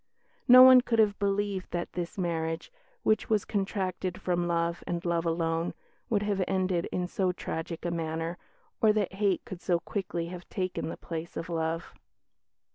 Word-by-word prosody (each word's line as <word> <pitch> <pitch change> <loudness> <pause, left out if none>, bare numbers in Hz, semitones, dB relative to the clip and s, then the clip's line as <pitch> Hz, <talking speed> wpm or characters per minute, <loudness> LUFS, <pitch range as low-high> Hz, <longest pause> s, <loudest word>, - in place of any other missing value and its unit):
"No 255 0 +11
one 255 -1 +9
could 235 -2 0
have 210 -2 +3
believed 200 -1 -1
that 175 0 -4
this 175 +1 -4
marriage, 165 - -2 0.3
which 215 0 +2
was 215 -3 +2
contracted 190 -3 -2
from 175 -1 0
love 170 0 0
and 175 0 -3
love 170 -1 0
alone, 165 0 0 0.3
would 210 -3 +1
have 200 -2 0
ended 185 -2 0
in 180 - -1
so 185 0 0
tragic 165 -1 -5
a 175 - 0
manner, 165 +1 -3 0.4
or 220 - +6
that 205 -3 0
hate 195 -1 0
could 180 -1 -8
so 175 -2 +1
quickly 175 -3 -3
have 180 -1 -9
taken 185 -4 -3
the - - -6
place 165 0 -6
of 165 - -5
love." 165 0 -2
180 Hz, 170 wpm, -29 LUFS, 170-200 Hz, 0.4 s, No